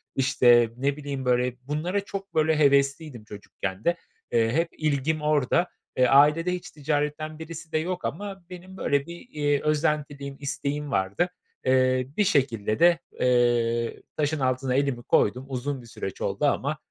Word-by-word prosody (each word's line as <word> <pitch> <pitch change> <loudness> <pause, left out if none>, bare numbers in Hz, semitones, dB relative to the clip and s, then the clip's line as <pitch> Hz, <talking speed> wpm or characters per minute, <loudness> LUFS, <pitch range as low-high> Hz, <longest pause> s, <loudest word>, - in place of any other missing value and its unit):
İşte, 120 -3 +4
ne 140 +2 0
bileyim, 140 -3 -5
böyle, 125 0 +1
bunlara 175 +7 -1
çok 195 0 -7
böyle 155 0 +3
hevesliydim 140 -2 +2
çocukken 100 -1 -7
de. 170 - +2 0.4
Eee, 115 -1 +2
hep 165 +4 +2
ilgim 155 0 0
orada. 150 +3 +2 0.3
Eee, 130 - +5
ailede 150 +5 +5
hiç 180 - -6
ticaretten 150 +1 -2
birisi 160 0 -8
de - - +1
yok 175 +1 -3
ama 195 - -5
benim 185 +1 -10
böyle 140 -5 +1
bir, 170 - -7
iii, 145 -1 0
özentiliğim, 150 -2 -1
isteğim 145 +1 -3
vardı. 95 - 0 0.4
Eee, 130 -1 +3
bir 210 - +4
şekilde 120 - +1
de, 170 0 +5 0.2
eee, 120 -2 +1
taşın 150 0 0
altına 130 0 0
elimi 135 -3 0
koydum. 125 +5 +2
Uzun 135 +1 -3
bir 120 - -14
süreç 95 -4 -7
oldu 100 +8 -1
ama 145 +1 0
140 Hz, 155 wpm, -26 LUFS, 125-155 Hz, 0.4 s, Eee